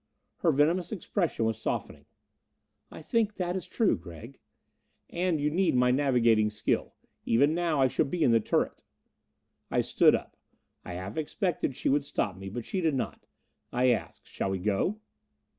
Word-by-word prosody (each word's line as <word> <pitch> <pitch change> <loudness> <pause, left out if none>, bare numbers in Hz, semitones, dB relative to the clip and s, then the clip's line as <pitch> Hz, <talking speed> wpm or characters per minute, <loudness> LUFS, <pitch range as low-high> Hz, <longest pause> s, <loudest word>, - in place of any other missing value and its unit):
Her 170 - +2
venomous 165 +5 +2
expression 180 - -1
was 110 0 -2
softening. - - -4 0.8
"I - - -11
think 215 +2 0
that 180 -1 -2
is 185 - -4
true, 225 -4 +2
Gregg." 95 +10 -11 0.7
"And 175 -2 0
you 150 +1 0
need 180 -2 +2
my 125 0 +4
navigating 120 -5 +3
skill. 105 0 -2 0.3
Even 140 +7 +3
now 170 -3 0
I 135 - +5
should 130 - 0
be 175 0 0
in - - +4
the 115 - +5
turret." 105 - -1 0.9
I - - +2
stood - - +4
up. - - -6 0.5
I 90 - -7
half 95 +4 -6
expected 160 - -1
she - - -3
would 140 +1 +2
stop 100 -8 -2
me, 95 +1 -8
but 115 +3 -6
she 190 - -2
did 160 -4 +1
not. 130 - -4 0.4
I 125 +1 +3
added, 115 - -3
"Shall - - -4
we 95 - -1
go?" 105 - 0
140 Hz, 170 wpm, -29 LUFS, 110-175 Hz, 0.9 s, I